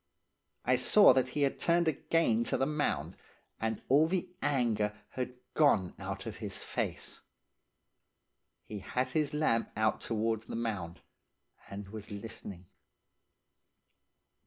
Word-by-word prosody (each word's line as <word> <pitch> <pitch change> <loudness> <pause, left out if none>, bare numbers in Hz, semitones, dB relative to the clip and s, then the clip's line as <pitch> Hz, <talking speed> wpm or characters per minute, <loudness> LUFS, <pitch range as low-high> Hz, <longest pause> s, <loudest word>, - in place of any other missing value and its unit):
I - - +4
saw 210 -1 +7
that 130 -1 +2
he 145 - +3
had 140 - 0
turned 170 0 +3
again 140 -6 +2
to - - 0
the 135 - +2
mound, 150 +1 -1 0.4
and 110 -1 -2
all 145 +4 +5
the 185 +1 -1
anger 110 -7 +1
had 125 -1 -4 0.2
gone 110 - +3
out - - -5
of - - -6
his - - -5
face. - - -4 1.4
He 105 - -7
had 125 +6 -2
his 150 +1 0
lamp 150 -7 +1
out 110 0 +1
towards 110 -1 -1
the - - -5
mound, 95 -7 -3 0.7
and 100 0 -7
was 110 -1 -8
listening. 100 -3 -7
115 Hz, 130 wpm, -32 LUFS, 105-145 Hz, 1.4 s, saw